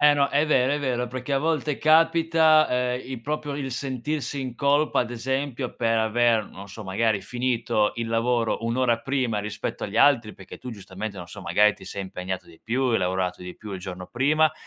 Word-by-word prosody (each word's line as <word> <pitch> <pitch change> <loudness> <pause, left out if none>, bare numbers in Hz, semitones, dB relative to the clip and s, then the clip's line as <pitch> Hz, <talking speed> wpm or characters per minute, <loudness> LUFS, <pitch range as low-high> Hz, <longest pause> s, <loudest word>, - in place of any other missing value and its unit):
Eh 150 0 +6
no, 140 -1 +2
è 145 +2 +2
vero, 130 -3 +3
è 150 - -1
vero 125 -3 -1
perché 130 +2 -5
a 135 - +3
volte 150 -1 0
capita, 160 0 +4
ehm, 125 0 0
il 130 -3 -5
proprio 145 +1 -3
il 135 -2 -4
sentirsi 135 +3 -3
in 130 -2 -5
colpa 145 +4 +2
ad 120 - -2
esempio 130 +1 -3
per 115 -1 +1
aver, 110 0 +2
non 100 0 -11
so 105 +3 -9
magari, 100 +2 +1
finito 120 -3 0
il 115 0 -2
lavoro 115 0 +1
1 115 +2 -1
ora 120 -3 +2
prima 125 -6 -1
rispetto 105 +1 -5
agli 105 +2 -4
altri 115 -5 +4
perché 95 - -11
tu 125 - -8
giustamente, 100 0 -7
non 90 -2 -7
so, - - -10
magari 100 +3 +3
ti - - -14
sei 100 - -5
impegnato 95 -1 -5
di 80 -1 -17
più, 120 +4 -1
hai 120 -3 +2
lavorato 90 0 -1
di 90 0 -8
più 105 -2 -9
il 95 - -5
giorno 90 -1 -7
prima 150 +5 +2
120 Hz, 210 wpm, -25 LUFS, 105-140 Hz, -, Eh